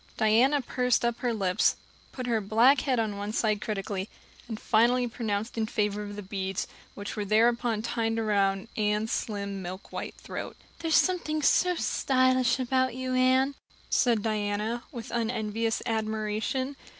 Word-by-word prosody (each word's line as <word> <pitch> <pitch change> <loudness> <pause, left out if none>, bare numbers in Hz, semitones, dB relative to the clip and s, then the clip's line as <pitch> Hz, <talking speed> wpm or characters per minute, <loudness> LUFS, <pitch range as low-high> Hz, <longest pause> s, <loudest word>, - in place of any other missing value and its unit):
Diana 245 +7 +4
pursed 250 -1 +1
up 235 0 -1
her 245 - 0
lips, 195 -3 +2 0.4
put 255 - -5
her 230 -3 +1
black 230 +7 +4
head 260 -3 0
on 215 -3 -1
one 205 +1 -4
side 215 -1 0
critically, 200 -2 -3 0.4
and 220 -2 -5
finally 245 +3 +3
pronounced 220 -1 -3
in 220 - 0
favor 210 -1 -1
of 205 0 -6
the 205 - -6
beads, 190 -1 -3 0.3
which 200 0 -6
were 210 - -2
thereupon 225 +1 +2
tied 225 -1 -1
around 200 -2 +1
Anne's 210 +1 0
slim 200 -2 -3
milk 185 +2 -8
white - - -5
throat. - - -7 0.2
"There's 325 -1 +1
something 310 -4 +2
so 360 +5 +4
stylish 255 -4 +2
about 260 0 +1
you, 255 0 -3
Anne," 260 +2 +3 0.4
said 230 -4 +3
Diana, 215 +2 -1
with 240 -3 -7
unenvious 225 -1 -1
admiration. 220 +4 -2
225 Hz, 150 wpm, -28 LUFS, 210-250 Hz, 0.4 s, Diana